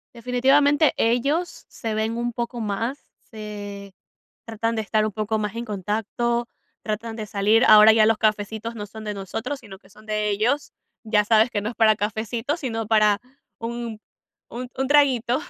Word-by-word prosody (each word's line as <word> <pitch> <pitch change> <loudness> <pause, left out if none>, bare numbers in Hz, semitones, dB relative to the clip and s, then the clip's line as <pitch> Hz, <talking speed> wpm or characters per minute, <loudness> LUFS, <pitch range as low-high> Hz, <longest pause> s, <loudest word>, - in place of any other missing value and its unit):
Definitivamente, 270 +5 +3
ellos 275 +10 0
se 225 -2 -5
ven 220 +2 -1
un 240 0 -2
poco 240 +1 -4
más, 225 +6 -2 0.3
se 205 -2 -8 0.5
tratan 225 0 -2
de 220 - -1
estar 215 +1 +1
un 210 - -4
poco 215 +1 -2
más 210 0 -3
en 235 +1 -4
contacto, 225 +4 -2 0.3
tratan 220 +1 -4
de 215 -2 -5
salir. 210 +4 +3
Ahora, 215 0 +9
ya 220 -1 +5
los 225 -1 +3
cafecitos 215 +1 -1
no 205 -2 -6
son 215 +1 -10
de 210 - -4
nosotros, 225 +8 -5
sino 190 -2 -12
que 190 - -23
son 215 +2 -18
de 215 0 -1
ellos, 230 +8 0 0.3
ya 210 -1 +2
sabes 220 +2 +4
que 205 - -1
no 210 - -3
es - - -11
para 220 -2 +5
cafecito, 225 +7 -2
sino 225 -7 -4
para 210 -1 +3 0.4
un 230 -1 -5 0.5
un 250 +1 -6
un 265 0 -1
traguito, 265 -3 +3
220 Hz, 175 wpm, -23 LUFS, 210-240 Hz, 0.5 s, Ahora